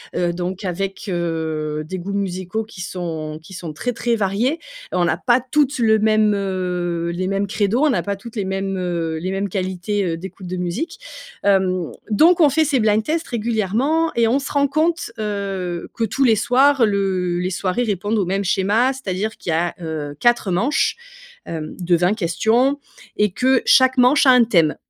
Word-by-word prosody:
heu, 175 -1 +1
donc 180 +2 -4
avec, 195 +3 -3
heu, 160 -3 -2
des 185 +4 -5
goûts 190 +3 -5
musicaux 190 +2 -2
qui 210 -4 -11
sont 160 -4 -5
qui 190 +4 -14
sont 170 -4 -6
très, 245 +10 -3
très 235 0 0
variés 220 - 0 0.3
et - - -3
on 175 - +2
n'a 165 0 +1
pas 240 +5 +2
toutes 280 +1 +1
le 220 -1 +4
même, 215 0 +3
heu, 180 -3 -2
les 185 +1 -2
mêmes 195 +1 -1
crédo. 210 +3 0
On 310 - +4
n'a 260 - 0
pas 200 0 -2
toutes 230 +4 -11
les 200 -3 -2
mêmes, 195 0 -2
heu, 170 -3 -2
les 185 +4 -3
mêmes 195 +1 -2
qualités, 190 +2 -2
heu, 165 -1 -2
d'écoute 190 +1 -9
de 185 +1 -4
musique 245 - -3 0.4
hem, 185 -4 +1 0.2
donc, 335 - +5
on 295 - +7
fait 315 +3 +2
ces 275 -3 +1
blind-tests 220 +10 +1
régulièrement 235 - 0
et 230 -1 +3
on 250 +4 +2
se 275 - -4
rend 280 -1 +2
compte, 315 +1 0
heu, 195 -5 -3
que 230 - -1
tous 270 +5 0
les 225 -4 +5
soirs, 255 +3 +4
le 190 -3 0
les 180 +1 -1
soirées 185 +5 -1
répondent 205 0 -1
au 195 - +1
même 195 +3 -1
schéma. 210 +8 +2
C'est-à-dire 215 -4 -3
qu'il - - -7
y - - +1
a, 170 +2 0
heu, 155 -3 -5
4 240 -5 +2
manches, 245 - +1 0.5
hem, 155 -2 -6
de 175 0 +2
20 180 +4 +2
questions 225 +9 +1 0.4
et 210 -2 +2
que 260 +5 +2
chaque 260 0 +5
manche 255 +4 +5
a 260 - +8
un 250 -2 +6
thème. 170 -9 +3
200 Hz, 195 wpm, -20 LUFS, 180-240 Hz, 0.5 s, a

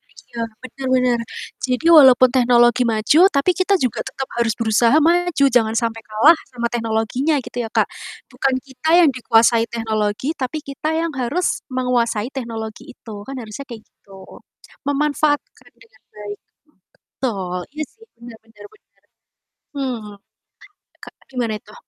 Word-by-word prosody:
kecil. 235 -1 -6 0.2
Benar 265 +1 -7 0.3
benar. - - -3 0.4
Jadi 255 +4 -1
walaupun 255 -2 +7
teknologi 240 -1 +4
maju 225 +7 +2
tapi 280 +6 +2
kita 380 +2 +2
juga 250 -4 -1
tetap 270 - -6
harus 235 -1 +1
berusaha 230 +3 +3
maju 335 -2 +2
jangan 225 -1 +3
sampai 225 0 -1
kalah 225 +10 +5 0.2
sama 235 -1 -2
teknologinya 235 +6 -1
gitu 245 - -9
ya, 225 - -6
Kak. - - +2 0.4
Bukan 265 -1 0
kita 270 +4 -5
yang 325 -4 +6
dikuasai 230 -1 +3
teknologi, 225 +5 -2
tapi 270 +3 -4
kita 280 +3 -4
yang 330 0 -1
harus 275 +8 -1
menguasai 245 -3 0
teknologi 225 -4 -6
itu, 220 -3 -11
kan, 270 - -6
harusnya 225 +4 -8
kayak 225 -2 -9
gitu. 195 -1 -16 0.5
Memanfaatkan 290 -3 -1
dengan 225 -1 -23
baik. 205 -1 -8 0.8
Betul. 190 -8 -2 0.2
Iya 305 - -2
sih 450 0 -20
benar 235 -1 -12
benar 210 -2 -16
benar. 435 - -29 0.7
Hmm. 255 -5 -3 0.9
E - - -35
kak - - -13 0.2
gimana 240 -4 -2
itu? - - -17
245 Hz, 145 wpm, -20 LUFS, 225-275 Hz, 0.9 s, walaupun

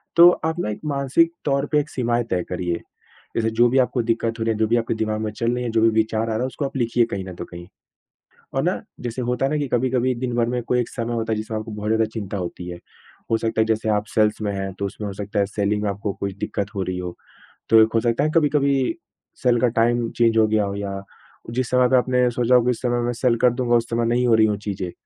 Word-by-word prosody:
तो 170 +1 +9 0.2
आप 160 0 0
ना 105 - -1
एक 105 - -4
मानसिक 140 +3 +2
तौर 140 0 +1
पे 150 - +4
एक 150 - -3
सीमाएँ 120 -3 0
तय 90 -1 +1
करिए। 90 -1 -2 0.6
जैसे 115 -1 +1
जो 120 0 +6
भी 130 - +1
आपको 125 0 +1
दिक्कत 115 0 -1
हो 115 - 0
रही 115 - +1
है, 105 - -5
जो 110 - +3
भी 120 - +2
आपके 115 -1 0
दिमाग 110 -1 -1
में 110 -1 -2
चल 115 +2 -1
रही 125 0 -2
है, 120 - -2
जो 110 -1 +2
भी 115 - +5
विचार 110 0 +1
आ - - 0
रहा 110 -1 -1
है 125 - 0
उसको 140 +2 -4
आप 135 - -6
लिखिए 120 -1 +2
कहीं 95 -1 -3
न 95 - -7
तो - - -6
कहीं। 85 0 -10 0.9
और - - +1
ना - - +1 0.2
जैसे 120 +1 -4
होता 125 +2 0
है - - -1
ना 150 - +1
कि 145 - -1
कभी-कभी 130 +1 +1
दिनभर 120 -1 -1
में 125 0 -1
कोई 125 +1 +1
एक 120 - -3
समय 120 -1 -3
होता 110 -1 -1
है - - +1
जिसमें 110 0 -3
आपको 110 +1 -7
बहुत 105 0 -4
ज़्यादा 110 0 +3
चिंता 100 -3 -4
होती 90 0 -5
है। 85 - -7 0.5
हो 115 - +4
सकता 110 0 -1
है, - - +5
जैसे 110 0 0
आप 105 0 +1
सेल्स 105 0 +2
में 105 - -1
हैं, 95 0 -3
तो 100 0 -3
उसमें 105 +2 -6
हो - - -5
सकता 105 +1 -4
है 100 - +2
सेलिंग 105 0 -1
में 105 - 0
आपको 100 +1 -3
कोई 100 -1 -2
दिक्कत 100 0 -3
हो 95 - -1
रही 90 -1 -3
हो। 90 -1 -5 0.6
तो 110 0 +7
एक 110 - +1
हो - - +5
सकता 120 +4 +1
है 155 - +1
कभी-कभी 140 -2 +2 0.5
सेल 120 -2 +3
का 125 - +4
टाइम 120 0 +2
चेंज 115 -1 +3
हो 110 -1 +5
गया 110 -1 +2
हो 100 0 -4
या 100 -1 -4 0.5
जिस 125 0 -1
समय 125 0 +4
पे 130 - +5
आपने 125 0 +2
सोचा 125 +1 +2
होगा 120 - +4
कि 125 - +2
उस 120 - -4
समय 120 -1 0
मैं 120 - -1
सेल 120 0 +1
कर 125 - +6
दूँगा, 120 -1 +1
उस 115 -1 +1
समय 115 0 0
नहीं 120 +1 +2
हो 115 - +4
रही 110 0 +5
हो 105 - 0
चीज़ें। 95 -3 -3
115 Hz, 280 wpm, -22 LUFS, 105-125 Hz, 0.9 s, तो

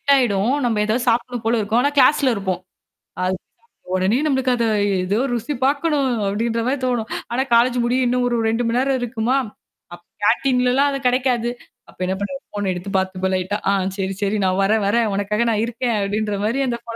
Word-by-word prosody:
ஆயிடும். 220 -3 +2
நம்ப 225 -3 0
ஏதாவது 240 +4 0
சாப்டணும் 240 0 -1
போல 230 +1 +2
இருக்கும். 220 +3 +1
ஆனா 285 - +2
கிளாஸ்ல 265 -1 +5
இருப்போம். 190 -2 -3 0.6
அது 185 0 0 0.6
உடனே 190 +5 +2
நம்மளுக்கு 265 -3 +1
அத 235 - 0 0.4
ஏதோ 205 +5 0
ருசி 240 +5 -2
பாக்கணும் 285 0 +1 0.2
அப்டின்ற 230 +3 -1
மாரி 275 +3 +1
தோணும். 240 -3 -1 0.2
ஆனா 255 +3 +1
காலேஜ்ஜு 245 +1 +4
முடிய 250 +2 +1
இன்னும் 250 0 +1
ஒரு 240 - 0
2 230 +2 0
மணி 230 +1 0
நேரம் 265 0 +1
இருக்குமா? 240 +1 0 0.6
அப்ப 175 - -12 0.2
கேன்டீன்ல்லாம் 250 +4 +3
அது 275 - -3
கெடைக்காது. 245 -2 +1 0.4
அப்ப - - -20
என்னா 190 +1 -1
பண்றது? 275 +7 -4
ஃபோன 205 -2 -2
எடுத்து 180 +3 -6
பாத்துப்பேன் 190 0 -1
லைட்டா. 185 +3 -1
"ஆ - - +4 0.3
சரி 195 0 -2
சரி 200 +2 0
நான் 185 +1 +1
வரேன் 215 +2 +2
வரேன். 230 +2 +2
உனக்காக 210 +3 0
நான் 215 0 0
இருக்கேன்"அப்படின்ற 215 -3 -1
மாரி 240 +5 0
அந்த 235 -1 -2
ஃபோன 230 -1 -7
235 Hz, 180 wpm, -20 LUFS, 205-250 Hz, 0.6 s, கிளாஸ்ல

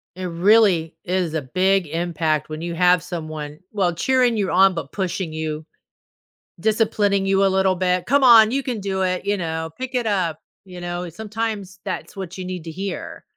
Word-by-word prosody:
It 185 0 -5
really 180 -2 +3
is 180 -3 -1
a 160 - -1
big 185 +6 +1
impact 160 -1 -1
when 155 0 -6
you 170 0 -4
have 180 0 +4
someone, 155 -4 -6
well, 190 -4 +1
cheering 250 +6 +2
you 200 -3 0
on, 190 +1 +5
but 165 - -6
pushing 185 -3 -3
you. 155 -1 -4 0.9
Disciplining 205 -1 +1
you 195 0 +3
a - - +5
little 190 0 +2
bit, 180 0 0
"Come 280 +3 +3
on, 230 -4 +8
you 275 +2 0
can 240 -5 -3
do 190 -1 -2
it," 185 0 -1
you 205 0 +1
know, 160 -2 -3
"Pick 260 0 -5
it 245 -2 0
up," 185 -7 0 0.3
you 180 -2 -10
know, 175 0 -4
sometimes 210 0 -5
that's - - -5
what 190 -2 -6
you 185 - -5
need 180 -2 -6
to 165 - -6
hear. 195 +4 -6
185 Hz, 190 wpm, -22 LUFS, 170-200 Hz, 0.9 s, on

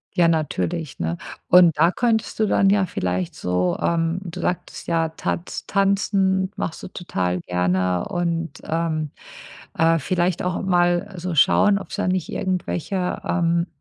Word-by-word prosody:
Ja, 175 -3 +4
natürlich, 160 -1 -1
ne? 85 +1 -2 0.3
Und 175 -4 +6
da 165 +3 +5
könntest 230 -1 0
du 215 - +4
dann 195 -1 +3
ja 200 0 +4
vielleicht 90 - -2
so, 90 0 0
ähm 165 +1 0
du 175 0 -7
sagtest 180 +1 -3
ja, 165 -1 +1
Tanz 165 +2 -4
Tanzen 195 -1 +2
machst 160 - -4
du - - -7
total 90 - -2
gerne 90 0 0
und, 170 -1 -2
ähm, 155 -2 -2 0.7
äh, 165 +1 +4
vielleicht 175 +3 0
auch 180 0 -2
mal 175 -1 +1
so 180 0 -4
schauen, 200 +7 +5
ob's 195 -4 -9
da - - -1
nicht 185 -3 -1
irgendwelche, 185 0 -2
ähm, 170 -1 +1
170 Hz, 150 wpm, -22 LUFS, 155-185 Hz, 0.7 s, Und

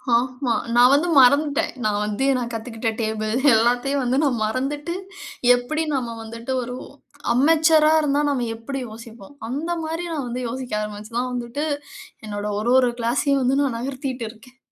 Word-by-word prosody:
ஆமா. 250 0 0 0.2
நான் 245 +1 +7
வந்து 300 +5 +3
மறந்துட்டேன். 285 +3 +3
நான் 210 -1 +1
வந்து 210 +5 -1
நான் 240 -1 -3
கத்துக்கிட்ட 225 0 -3
டேபிள் 215 0 -2 0.2
எல்லாத்தையும் 245 +5 +2
வந்து 250 +2 +1
நான் 255 -6 +1
மறந்துட்டு 285 +8 -2 0.6
எப்பிடி 275 +6 -2
நாம 240 -4 -2
வந்துட்டு 230 +3 -7
ஒரு 245 +1 -6 0.6
அன்மெச்சூரா 310 +3 +5
இருந்தா 290 -1 +1
நாம 260 -4 0
எப்பிடி 260 +4 -5
யோசிப்போம்? 225 +1 -12 0.2
அந்தமாரி 325 +4 -3
நான் 290 -5 -3
வந்து 245 +1 -4
யோசிக்க 250 0 -5
ஆரம்பிச்சு 210 +1 -7
தான் 250 +1 -1
வந்துட்டு, 245 +4 -3 0.6
என்னோட 205 -1 -4
ஒரு 230 +3 0
ஒரு 250 -1 +3
கிளாஸ்ஸையும் 270 +4 +1
வந்து 265 +2 +2
நான் 270 -5 0
நகர்த்திட்டு 260 -1 -4
இருக்கேன். 235 +3 -17
250 Hz, 150 wpm, -22 LUFS, 230-280 Hz, 0.6 s, நான்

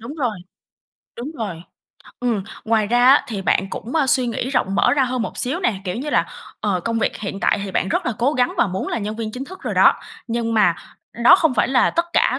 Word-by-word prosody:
đúng 235 +6 -8
rồi, 250 -9 -2 0.8
đúng 250 +6 -5
rồi. 190 -8 -5 0.6
Ừm, 235 -5 0 0.2
ngoài 220 -1 +2
ra 240 +3 +2
á, 275 +3 +6
thì 205 -4 -4
bạn 190 0 +1
cũng, 240 - -6
a, 310 -4 +2
suy 255 -1 +2
nghĩ 240 +2 -3
rộng 195 -7 0
mở - - +3
ra 275 -2 +3
hơn 250 -1 -2
một - - -5
xíu 270 +8 0
nè. 235 - +1
Kiểu 180 - -3
như 285 +5 -4
là, - - +2 0.3
ờ, 200 -4 0
công 230 +4 -2
việc - - -1
hiện 200 -1 -5
tại 195 - +1
thì 195 - -5
bạn 190 - -1
rất - - -1
là 245 - 0
cố 255 +5 +2
gắng 250 -4 +1
và - - +4
muốn 190 0 -4
là - - -2
nhân 215 0 -4
viên 220 -1 -4
chính 255 +3 -5
thức 375 +6 -11
rồi - - -4
đó, - - +6 0.3
nhưng 230 -1 -2
mà 195 -6 +4 0.5
đó 360 - +9
không 320 -8 +1
phải - - +2
là 260 -1 +3
tất 340 - 0
cả. - - +2
235 Hz, 250 wpm, -20 LUFS, 210-260 Hz, 0.8 s, đó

